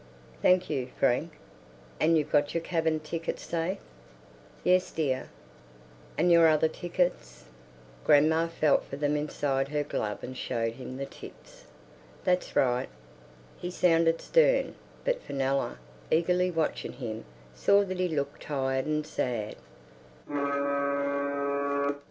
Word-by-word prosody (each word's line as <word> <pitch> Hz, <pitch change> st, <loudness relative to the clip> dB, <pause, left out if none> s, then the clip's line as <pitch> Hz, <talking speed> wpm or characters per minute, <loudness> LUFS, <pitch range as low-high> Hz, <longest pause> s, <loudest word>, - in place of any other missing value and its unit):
"Thank 185 Hz, 0 st, +4 dB
you, 130 Hz, -2 st, -2 dB
Frank." 120 Hz, -, +1 dB, 0.7 s
"And 165 Hz, +1 st, +4 dB
you've 150 Hz, -, -1 dB
got 145 Hz, +1 st, +2 dB
your 165 Hz, -, 0 dB
cabin 160 Hz, -2 st, 0 dB
tickets 165 Hz, +2 st, -4 dB
safe?" 170 Hz, +3 st, -2 dB, 0.9 s
"Yes, 185 Hz, 0 st, +3 dB
dear." 135 Hz, -5 st, -1 dB, 0.9 s
"And 175 Hz, +3 st, +3 dB
your 170 Hz, -1 st, +7 dB
other 155 Hz, 0 st, +4 dB
tickets?" 175 Hz, -, -2 dB, 0.6 s
Grandma 160 Hz, -, +4 dB
felt 155 Hz, -3 st, +2 dB
for -, -, -7 dB
them 145 Hz, +1 st, 0 dB
inside 145 Hz, -2 st, -1 dB
her 150 Hz, +1 st, -1 dB
glove 105 Hz, -7 st, -3 dB
and 130 Hz, -, -6 dB
showed 115 Hz, -3 st, -2 dB
him 130 Hz, +1 st, -8 dB
the 140 Hz, -, -3 dB
tips. -, -, -13 dB, 0.6 s
"That's 180 Hz, 0 st, 0 dB
right." 125 Hz, 0 st, +2 dB, 0.7 s
He 175 Hz, -, -5 dB
sounded 165 Hz, -2 st, +3 dB
stern, -, -, +3 dB, 0.3 s
but -, -, +1 dB
Fenella, 135 Hz, -, -1 dB, 0.3 s
eagerly 180 Hz, +3 st, +2 dB
watching 165 Hz, -3 st, -2 dB
him, 110 Hz, -4 st, -5 dB, 0.3 s
saw 200 Hz, -, +4 dB
that 185 Hz, -2 st, -4 dB
he 185 Hz, -, +2 dB
looked 145 Hz, -3 st, -3 dB
tired 135 Hz, -2 st, -1 dB
and 150 Hz, 0 st, 0 dB
sad. 115 Hz, -7 st, -2 dB
155 Hz, 120 wpm, -29 LUFS, 135-175 Hz, 0.9 s, your